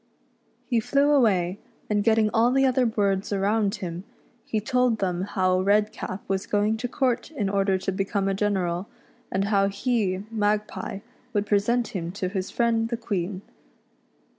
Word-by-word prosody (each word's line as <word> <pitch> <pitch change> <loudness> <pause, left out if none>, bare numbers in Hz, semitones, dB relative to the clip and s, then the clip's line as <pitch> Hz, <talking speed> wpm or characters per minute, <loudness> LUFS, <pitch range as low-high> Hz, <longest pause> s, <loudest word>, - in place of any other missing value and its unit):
He 240 -3 +1
flew 280 +5 +2
aw^ay, 200 -10 +3 0.3
and 205 -1 +1
getting 220 -1 +3
all 230 +2 +4
the 270 +1 +3
other 255 -1 +3
birds 200 -3 0
around 200 +1 +1
him, 180 -3 -5 0.4
he 220 - -1
told 250 +1 +1
them 180 -3 -1
how 185 -1 +1
Redcap 205 -1 0
was 195 0 -2
going 210 +2 +1
to 245 - -3
court 255 -1 0
in 275 -11 -2
order 195 -1 +2
to 190 +1 -2
become 195 +1 -1
a 195 - +1
general, 190 -2 -1 0.4
and 190 +1 0
how 200 -1 +3
he, 200 -2 -1
Magpie, 210 -2 -1 0.3
would 205 -1 +1
present 220 +4 +1
him 170 -3 -4
to 185 -2 -2
his 190 -1 -3
friend 230 -1 +1
the 235 - -2
Queen. 195 -4 -3
205 Hz, 160 wpm, -25 LUFS, 195-225 Hz, 0.4 s, all